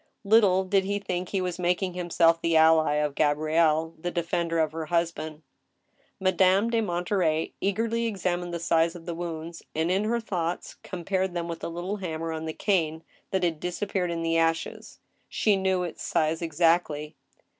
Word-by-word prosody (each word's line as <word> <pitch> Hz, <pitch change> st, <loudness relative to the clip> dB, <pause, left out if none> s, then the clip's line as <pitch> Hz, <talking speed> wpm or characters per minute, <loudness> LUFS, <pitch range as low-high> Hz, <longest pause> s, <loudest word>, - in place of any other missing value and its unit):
Little 200 Hz, -3 st, +4 dB
did 190 Hz, +1 st, +2 dB
he 200 Hz, +1 st, -1 dB
think 180 Hz, -3 st, -3 dB
he 195 Hz, -, -1 dB
was 180 Hz, -1 st, -3 dB
making 180 Hz, +1 st, 0 dB
himself 170 Hz, -2 st, +2 dB
the 165 Hz, -1 st, +2 dB
ally 160 Hz, -1 st, +5 dB
of 150 Hz, -1 st, 0 dB
Gabrielle, 155 Hz, +2 st, +2 dB
the 175 Hz, +2 st, -3 dB
defender 170 Hz, -1 st, -1 dB
of 160 Hz, -2 st, +2 dB
her 160 Hz, 0 st, -5 dB
husband. 160 Hz, -2 st, -2 dB, 0.8 s
Madame 190 Hz, +3 st, +3 dB
de 230 Hz, -1 st, +2 dB
Monterey 175 Hz, -4 st, 0 dB
eagerly 230 Hz, +4 st, 0 dB
examined 180 Hz, -4 st, -2 dB
the 170 Hz, -, -2 dB
size 165 Hz, 0 st, +2 dB
of 165 Hz, -2 st, -10 dB
the 170 Hz, -, -3 dB
wounds, 165 Hz, -1 st, -6 dB
and, 160 Hz, +3 st, +1 dB
in 195 Hz, +3 st, +1 dB
her 235 Hz, +2 st, +1 dB
thoughts, 180 Hz, -6 st, -3 dB
compared 185 Hz, +1 st, -2 dB
them 170 Hz, -1 st, -2 dB
with 170 Hz, -1 st, -5 dB
the -, -, -4 dB
little 175 Hz, +5 st, -4 dB
hammer 165 Hz, -4 st, -4 dB
on 160 Hz, 0 st, -4 dB
the 160 Hz, -, -2 dB
cane 160 Hz, -5 st, 0 dB, 0.3 s
that 190 Hz, -1 st, -1 dB
had 165 Hz, -3 st, 0 dB
disappeared 180 Hz, +1 st, -2 dB
in 165 Hz, -1 st, -2 dB
the 165 Hz, 0 st, +2 dB
ashes; 165 Hz, 0 st, -1 dB, 0.3 s
she 210 Hz, -2 st, +2 dB
knew 190 Hz, -1 st, +1 dB
its 175 Hz, -, -6 dB
size 160 Hz, 0 st, 0 dB
ex 165 Hz, -2 st, -5 dB
actly. 165 Hz, -3 st, +2 dB
175 Hz, 175 wpm, -27 LUFS, 165-185 Hz, 0.8 s, ally